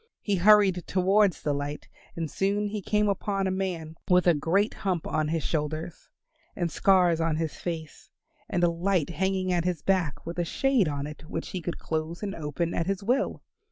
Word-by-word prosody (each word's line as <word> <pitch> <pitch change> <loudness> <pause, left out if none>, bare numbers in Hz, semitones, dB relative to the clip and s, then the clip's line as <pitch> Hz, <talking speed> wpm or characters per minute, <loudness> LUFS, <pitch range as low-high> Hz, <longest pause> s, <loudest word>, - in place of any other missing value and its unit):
He 205 -2 +1
hurried 195 -1 +5
towards 190 0 +2
the 145 - +1
light 145 +1 -4 0.3
and 165 -1 -2
soon 200 +6 0
he 210 0 -4
came 210 +2 +1
upon 195 0 -1
a 190 - 0
man 175 -4 -3
with 180 0 +5
a 175 - +6
great 180 +8 +1
hump 180 -5 -2
on 155 -1 0
his 160 -1 -1
shoulders 155 +1 -3 0.5
and 170 -2 -1
scars 180 -3 +3
on 165 -1 +1
his 160 -1 -2
face, 160 -4 -6 0.4
and 175 - 0
a 175 - +5
light 175 -1 0
hanging 190 +2 0
at 175 -1 +1
his 175 -3 -2
back, 180 -7 0
with 170 +1 -5
a - - +2
shade 255 +3 +2
on 145 -1 -2
it 150 +1 -9
which 165 - -4
he 185 - -4
could 170 +1 -4
close 160 +3 -3
and 200 -1 -2
open 160 +1 -3
at 165 - -1
his 195 0 -1
will. 250 +7 0
175 Hz, 195 wpm, -27 LUFS, 160-195 Hz, 0.5 s, a